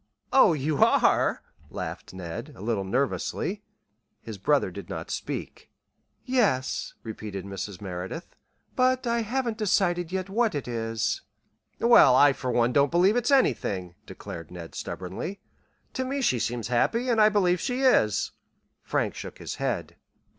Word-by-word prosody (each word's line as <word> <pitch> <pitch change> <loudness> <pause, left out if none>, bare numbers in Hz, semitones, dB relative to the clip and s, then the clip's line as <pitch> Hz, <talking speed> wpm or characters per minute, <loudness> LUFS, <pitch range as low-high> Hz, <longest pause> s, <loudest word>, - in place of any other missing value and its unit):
"Oh, 260 -10 +7
you 150 0 +1
are," - - +3 0.3
laughed - - -6
Ned, 95 - -7
a - - -12
little 110 -2 -1
nervously. 140 - -1 0.6
His - - -9
brother - - +2
did - - -9
not - - -5
speak. - - -5 0.6
"Yes," 210 - 0
repeated 105 -4 -6
Mrs. 100 0 -6
Merideth; 95 - -6 0.4
"but 255 0 +2
I 235 0 +1
haven't 235 0 -2
decided 175 -4 +1
yet 190 0 -2
what 220 -1 +1
it 140 - -3
is." 115 -1 -2 0.6
"Well, 230 - +7
I 145 +1 +6
for 130 -1 -4
one 120 0 +2
don't 140 0 +4
believe 180 - +4
it's 245 -1 +1
anything," 100 - +1
declared 85 -2 -8
Ned, 85 -2 -9
stubbornly. 95 - -5 0.5
"To 260 - -1
me 275 +2 -2
she 125 - +2
seems 120 +1 -2
happy, 230 - +1
and 230 -3 +3
I 215 - +7
believe 180 -4 +2
she 255 0 -2
is." 110 - +3 0.5
Frank - - -1
shook - - -8
his - - -6
head. - - -2
145 Hz, 145 wpm, -26 LUFS, -, 0.6 s, Oh